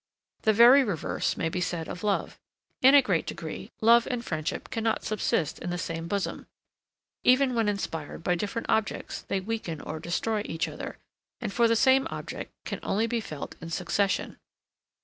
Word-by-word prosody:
The 220 - +4
very 245 +6 +8
reverse 200 - -1
may 165 - 0
be 180 +2 -2
said 170 -2 -2
of 180 - -7
love. 205 -2 -1 0.4
In 265 +2 +8
a 280 - +8
great - - 0
degree, - - -6
love 235 +1 +6
and 245 -2 -3
friendship 155 +3 -3
cannot 225 -1 0
subsist 190 -7 -1
in 175 - -5
the 175 - -2
same 165 -1 -4
bosom; 200 +2 -3 0.8
even 255 +1 +4
when 225 -3 +2
inspired 165 -6 -4
by 180 - +2
different 205 +6 -3
objects 220 -2 -1
they 195 - -2
weaken 190 -6 -4
or 160 - -5
destroy 210 +6 -1
each 165 -4 -2
other, - - -7 0.4
and 215 -5 -4
for 235 -1 +4
the 230 - +3
same 265 +3 +4
object - - -6
can - - -4
only 215 +3 0
be 230 0 -1
felt 150 -8 -7
in 165 - -7
succession. 185 +4 -1
205 Hz, 175 wpm, -28 LUFS, 170-230 Hz, 0.8 s, very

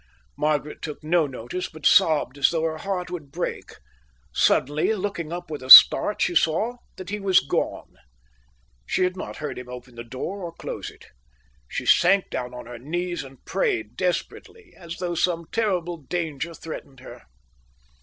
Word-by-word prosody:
Margaret 150 0 -1
took 150 -1 -7
no 160 0 +2
notice, 130 +7 -6
but 155 -2 -12
sobbed 155 -8 +4
as 135 - +5
though 165 -1 -1
her 160 -1 -2
heart 180 -2 -4
would 155 -6 -7
break. 175 +4 -5 0.6
Suddenly, 150 +10 +2
looking 185 -5 -4
up 175 -1 -6
with 150 - -5
a 130 - -9
start, 205 - +9
she - - 0
saw 175 +9 +1 0.2
that 185 0 -9
he 210 - -3
was 195 -2 +4
gone. 135 - -3 0.9
She 185 - +1
had 180 0 0
not 185 - -7
heard 150 -4 -5
him 125 0 -10
open 125 0 -10
the 120 0 -8
door 130 - -6
or 170 -2 -6
close - - -6
it. - - -17 0.6
She - - -5
sank 195 +2 +4
down 125 -1 -4
on 125 -1 -9
her 120 0 -9
knees 175 +6 -3
and 135 -1 -15
prayed 395 -9 -1
desperately, 355 - -4
as 170 -2 -9
though 175 -1 -3
some 170 0 0
terrible 180 -6 -1
danger 160 +1 -4
threatened 140 -5 -9
her. - - -11
165 Hz, 170 wpm, -24 LUFS, 145-180 Hz, 0.9 s, start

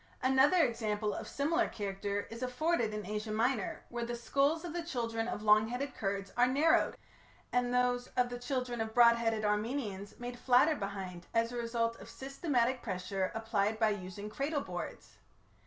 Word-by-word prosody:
Another 265 +7 +5
example 215 -2 -1
of - - -5
similar 330 +5 +1
character 200 0 -3
is 230 +2 -7
afforded 255 -1 0
in 210 0 -4
Asia 210 +1 -3
Minor, 225 0 0
where 240 0 -3
the 240 +1 -3
skulls 280 +7 +1
of 335 - -5
the 345 - -2
children 230 -8 -2
of 210 - -4
long 215 0 +5
headed 255 +3 -3
Kurds 195 -1 -3
are 245 +1 +5
narrowed, 290 +5 +3 0.6
and 245 0 +2
those 250 0 +1
of 250 -1 +3
the 245 0 -5
children 250 -2 -2
of 220 0 -4
broad 235 -1 +7
headed 225 -2 0
Armenians 210 -1 -2
made 245 0 -6
flatter 260 +6 +5
behind 190 -5 -5
as 230 +1 +2
a - - -6
result 230 -1 -1
of - - -11
systematic 265 -3 -1
pressure 190 -1 -2
applied 220 -1 0
by 220 -1 +3
using 200 0 -5
cradle 280 +7 -2
boards. - - -7
235 Hz, 170 wpm, -33 LUFS, 210-255 Hz, 0.6 s, broad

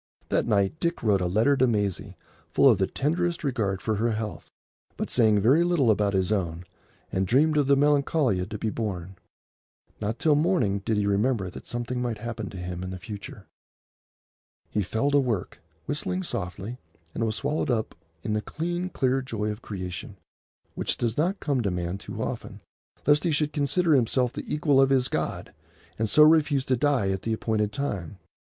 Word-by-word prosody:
That - - +1
night 100 +6 +1
Dick 170 -5 -1
wrote 100 -4 +3
a 90 - +1
letter 110 +10 +3
to 130 -1 +3
Maisie 105 -5 -1 0.3
full - - +4
of - - +5
the - - +2
tenderest 170 +4 -1
regard 110 -9 -1
for 110 -2 0
her 115 +2 +1
health, 110 -1 -5 0.5
but - - -3
saying 110 -4 +4
very 135 +11 +5
little 170 -9 +3
about 100 -1 +1
his 95 +1 +1
own, 90 -4 -1 0.5
and 95 0 0
dreamed 150 - +3
of 145 -2 +2
the 140 0 +5
Melancolia 140 - +2
to 105 - -4
be 110 +1 -2
born. 95 -5 -4 0.8
Not 110 +2 -2
till 155 - +3
morning 145 - +2
did 105 +2 -1
he 105 - +1
remember 100 -1 +1
that - - -10
something 120 +1 -3
might 120 -3 -2
happen 110 -1 -5
to 95 - -9
him 90 0 -5
in 95 - -4
the 95 - -5
future. 100 +1 -9 1.3
He 105 - +1
fell 110 +9 0
to 145 - +5
work, 120 -8 -2 0.3
whistling 180 +6 -2
softly, 100 - -5 0.3
and - - -2
was 110 -1 0
swallowed 145 +3 -1
up 115 -3 0 0.3
in 105 - -1
the 105 - 0
clean, 175 +7 -3
clear 135 -5 +1
joy 110 -5 -3
of 105 +2 -8
creation, 90 -5 -6 0.6
which - - -1
does 115 -2 -1
not 180 +6 0
come 140 -4 0
to 100 - 0
man 90 +1 -3
too - - -5
often, - - -6 0.4
lest 145 +1 +4
he 175 - +1
should 150 -1 0
consider 155 +3 +2
himself 125 -1 +2
the - - -6
equal 145 -2 +3
of 135 - +4
his 130 -2 +3
God, - - -3 0.5
and 110 -1 0
so 150 - +7
refuse 150 -3 +4
to 130 - +2
die 125 -7 +1
at 95 -1 -2
the 115 - -1
appointed 110 -2 0
time. 105 - -4
115 Hz, 190 wpm, -26 LUFS, 100-145 Hz, 1.3 s, so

